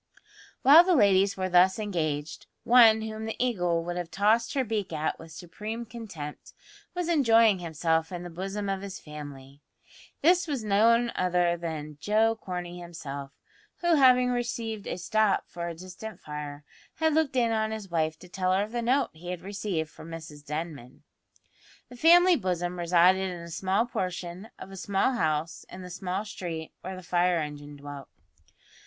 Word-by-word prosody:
While 300 +6 +9
the 365 -1 +3
ladies 200 -5 +4
were 185 0 -1
thus 185 +1 +5
engaged, 160 -8 -3 0.2
one 225 -2 +6
whom 220 0 -5
the 220 - -4
Eagle 180 -9 0
would 175 +1 -4
have 175 -2 -4
tossed 220 +7 +2
her 270 - +2
beak 215 -5 -3
at 155 -1 -2
with 165 0 -12
supreme 210 +8 -6
contempt 210 -11 -8 0.4
was 355 -1 -2
enjoying 230 - +4
himself 160 0 -1
in 175 -1 -5
the 175 - -8
bosom 195 +4 -4
of 195 -1 -2
his 195 -1 -7
family. 145 -2 -10 0.6
This 350 +2 +4
was 275 -7 -2
none 230 +3 +3
other 180 -1 +1
than 155 -3 -6
Joe 220 +2 +2
Corney 180 -4 -6
himself, 140 -5 -7 0.5
who, 345 -1 +3
having 250 -4 +5
received 230 -3 -3
a - - -3
"stop" 210 +3 +1
for 170 0 -5
a 170 - -5
distant 185 +4 -9
fire, 150 -1 -7 0.3
had 320 -1 +1
looked 305 -3 +1
in 235 -2 +2
on 220 -1 0
his 215 -4 -6
wife 160 -1 0
to 180 - -12
tell 185 +1 0
her 195 +2 +2
of 210 - -7
the 240 0 -2
note 255 +2 +1
he 170 +3 -10
had 180 -1 -4
received 190 -5 -3
from 165 - -12
Mrs 155 -3 -9
Denman. 150 -4 -6 0.9
The 245 - -11
family 350 +6 +6
bosom 180 - -2
resided 180 +2 +4
in 175 -1 -6
a 170 0 -9
small 190 +6 +1
portion 180 -1 -4
of 195 - -10
a 195 - -9
small 195 +6 +1
house 160 -7 -1
in 185 0 -9
the 180 - -9
small 185 +3 -3
street 170 -6 -6
where 190 +1 -6
the 185 - -10
fire 175 0 +2
engine 145 -2 -5
dwelt. 145 -1 -9
185 Hz, 175 wpm, -28 LUFS, 165-220 Hz, 0.9 s, While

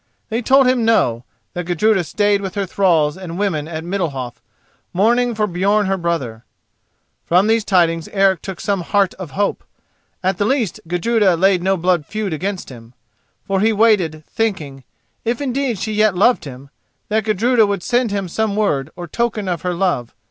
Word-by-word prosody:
They 230 +2 -1
told 265 +3 +4
him 250 -2 +2
no; 125 - +2 0.3
that 175 -1 -5
Gudruda 190 +2 +2
stayed 205 +3 +1
with 190 -2 -5
her 200 -1 -1
thralls 170 -6 +2
and 180 -2 -7
women 175 -7 -1
at 160 -1 -5
Middalhof, 155 - -4 0.5
mourning 235 +5 +2
for 215 0 0
Björn 200 +3 +1
her 195 0 +1
brother. 160 -11 -3 0.8
From 180 +3 +3
these 225 0 +2
tidings 170 -5 +2
Eric 195 -2 +2
took 190 -3 -7
some 200 -3 -1
heart 195 +2 +1
of 185 -1 -8
hope: 205 0 0 0.6
at 185 -1 0
the 205 - +2
least 240 - 0
Gudruda 190 +2 +2
laid 185 +1 +3
no 190 +1 +1
blood 175 -3 0
feud 215 -5 -3
against 190 +4 -4
him. 120 -1 -13 0.5
For 195 -1 0
he 220 +3 +3
waited, 200 -8 +2
thinking, 155 - -3 0.4
if 235 +1 -1
indeed 270 -4 -1
she 215 +3 -3
yet 215 -2 +2
loved 235 +4 +3
him, 135 0 -10 0.4
that 220 +1 +1
Gudruda 220 +2 +3
would 200 -3 -2
send 245 -1 +1
him 200 -2 -2
some 215 +3 -1
word 150 -10 0
or 175 -1 -7
token 220 +2 -2
of 175 -3 -2
her 180 -1 -2
love. 170 -10 -1
195 Hz, 175 wpm, -19 LUFS, 170-215 Hz, 0.8 s, told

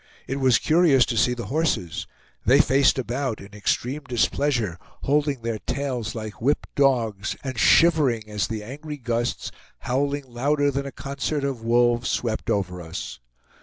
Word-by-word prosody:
It 135 - -3
was 130 -3 +4
curious 155 -6 +4
to 120 - -3
see 125 +2 +2
the 120 - -5
horses; 145 - -1 0.4
they - - +5
faced 135 +2 +4
about 125 -1 -2
in 100 +1 -12
extreme 125 +7 -1
displeasure, 120 - 0 0.2
holding 145 -3 +1
their 115 -2 -2
tails 125 -5 -3
like 110 -2 -7
whipped 140 +5 0
dogs, 115 -8 +1
and 130 -2 -4
shivering 150 -10 +4
as 105 -1 -1
the 110 -2 -4
angry 145 +6 -7
gusts, 120 -2 -2 0.3
howling 140 +2 -1
louder 140 +4 +1
than 140 +1 -3
a - - -6
concert 140 +2 -3
of 135 -4 -2
wolves, 120 +1 +2
swept 115 -3 -2
over 90 -3 -1
us. 80 -6 -7
125 Hz, 155 wpm, -24 LUFS, 115-140 Hz, 0.4 s, they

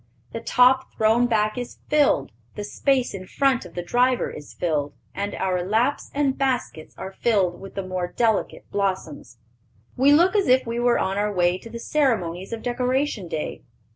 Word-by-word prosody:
The - - -4
top 255 +1 +3
thrown 225 +3 +3
back 215 0 +1
is 245 - -7
filled, 290 - +2 0.2
the 210 - -4
space 260 +4 0
in 185 -1 -7
front 270 -3 +1
of 175 - -13
the 175 - -3
driver 245 +6 +1
is 150 - -10
filled, 150 -4 -2 0.2
and 200 +1 -3
our 185 -2 -1
laps 225 +9 0
and 280 -2 +1
baskets 255 - -2
are 190 - -6
filled 195 -4 0
with 195 - -10
the 195 - -3
more 185 -1 -2
delicate 220 +3 0
blossoms. 190 - -3 0.6
We 270 +3 +4
look 345 +7 +5
as 400 -2 +2
if 255 +1 +4
we 230 +1 -3
were 240 0 +3
on 190 +1 -1
our 210 0 0
way 180 -1 +1
to 230 - -11
the 235 - -7
ceremonies 220 - 0
of 230 -1 -5
Decoration 250 -3 -1
Day. 160 -2 -4
220 Hz, 180 wpm, -24 LUFS, 185-255 Hz, 0.6 s, look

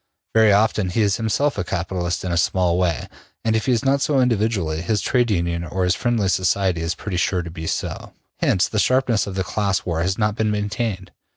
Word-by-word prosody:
Very 110 -1 +5
often 105 -1 +2
he 110 +5 +1
is 100 -2 +1
himself 115 +3 0
a - - 0
capitalist 90 0 -3
in 90 - -2
a - - 0
small 90 +1 +1
way, 85 -3 0 0.4
and 110 0 +2
if 110 - -1
he - - +3
is 120 +1 +1
not 135 +1 +2
so 140 -2 +2
individually, 105 -10 0
his 105 +4 0
trade 120 +3 +1
union 85 -3 -1
or 90 +3 -2
his 90 -1 +3
friendly 120 -4 0
society 95 -1 +1
is 80 0 -2
pretty 95 -3 -4
sure 90 +1 0
to 85 - -8
be 80 0 -6
so. - - -4 0.2
Hence 95 - +2
the 110 - -2
sharpness 125 -1 +2
of 95 - -5
the 95 - 0
class 100 0 -1
war 85 -2 -1
has 95 +2 0
not 105 -1 +1
been 110 -1 0
maintained. 105 -2 -2
100 Hz, 220 wpm, -21 LUFS, 90-110 Hz, 0.4 s, Very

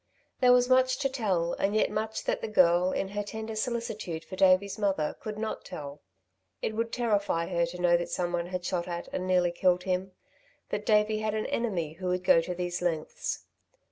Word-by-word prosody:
There 250 -1 +6
was 250 0 +5
much 255 0 +4
to 275 0 0
tell 190 -10 0
and 200 +2 +1
yet 215 - +2
much 220 +1 -2
that - - -1
the - - -3
girl, 180 -3 +4
in 190 - -2
her 205 +1 -2
tender 220 +1 -6
solicitude 215 -8 -3
for 185 - -8
Davey's 190 +2 +3
mother, 190 -7 0
could 215 -1 -6
not 220 0 -3
tell. 145 -1 -8 0.6
It - - -2
would 230 +1 -1
terrify 205 -8 0
her 170 -2 +1
to 180 +1 -8
know 175 -1 +4
that 175 - -4
someone 175 -1 -1
had 180 0 -4
shot 175 -1 -1
at 175 -1 -5
and 185 - -2
nearly 180 -1 +3
killed 180 +1 +2
him, 185 0 -2 0.6
that 210 - -3
Davey 215 0 +3
had 215 0 -1
an 215 - -1
enemy 180 -10 -1
who 185 +3 -6
would 180 0 0
go 165 - +6
to 180 +2 -4
these 175 0 -3
lengths. 165 -3 -2
185 Hz, 205 wpm, -29 LUFS, 175-215 Hz, 0.6 s, There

